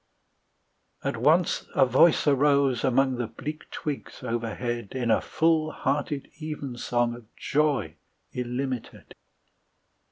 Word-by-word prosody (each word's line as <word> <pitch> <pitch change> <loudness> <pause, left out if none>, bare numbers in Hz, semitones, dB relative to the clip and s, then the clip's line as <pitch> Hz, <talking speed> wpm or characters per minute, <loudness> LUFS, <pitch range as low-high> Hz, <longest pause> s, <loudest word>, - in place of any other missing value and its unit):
At - - -1
once 165 +3 +2
a 135 - +6
voice 135 +6 +4
arose 140 -3 +3
among 130 0 +2
The 120 -2 -2
bleak 150 +7 -7
twigs 145 -3 -5
overhead, 120 -1 -3
In 120 -3 0
a 110 - +3
full 160 -1 +2
hearted 140 0 -2
evensong 125 -5 -2
Of 120 -1 -13
joy 140 - 0 0.3
illimited. 125 0 -4
130 Hz, 105 wpm, -26 LUFS, 120-150 Hz, 0.3 s, a